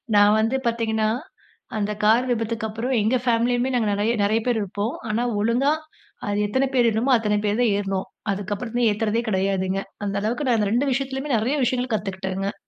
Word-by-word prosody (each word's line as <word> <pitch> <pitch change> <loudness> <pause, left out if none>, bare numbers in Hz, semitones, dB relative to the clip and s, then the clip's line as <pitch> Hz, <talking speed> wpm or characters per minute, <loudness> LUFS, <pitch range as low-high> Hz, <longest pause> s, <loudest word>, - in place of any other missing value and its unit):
நான் 205 +1 +6
வந்து 225 +4 +1
பாத்தீங்கன்னா, 220 -2 +1 0.7
அந்த 210 0 -1
கார் 225 +4 +4
விபத்துக்கு 225 -1 -1
அப்புறம் 230 +5 -2
எங்க 220 +5 +2
ஃபேமிலியுமே 245 +1 +2
நாங்க 225 -3 +1
நறைய 210 +3 +1
நறைய 215 +2 +2
பேர் 240 -3 +2
இருப்போம். 205 +3 -3 0.2
ஆனா, 225 +3 0 0.2
ஒழுங்கா 245 +7 +2 0.5
அது 205 0 0
எத்தன 260 +6 +1
பேர் 240 -2 +4
வேணுமோ, 225 +5 +1
அத்தன 210 -2 0
பேர் 210 +3 0
தான் 230 -4 +3
ஏற்னோம். 195 -2 -2 0.2
அதுக்கப்புறம் 220 +5 -1
ஏத்துறதே 220 +2 0
கெடையாதுங்க, 190 -1 0 0.3
அந்த 200 -1 -2
அளவுக்கு 240 +7 -1
நான் 240 -3 +3
அந்த 205 - +1
2 270 +4 +2
விஷயத்துலயுமே 270 +1 -2
நறைய 255 +7 0
விஷயங்கள் 250 -1 -1
கத்துகிட்டேங்க. 195 0 -3
220 Hz, 170 wpm, -23 LUFS, 205-245 Hz, 0.7 s, நான்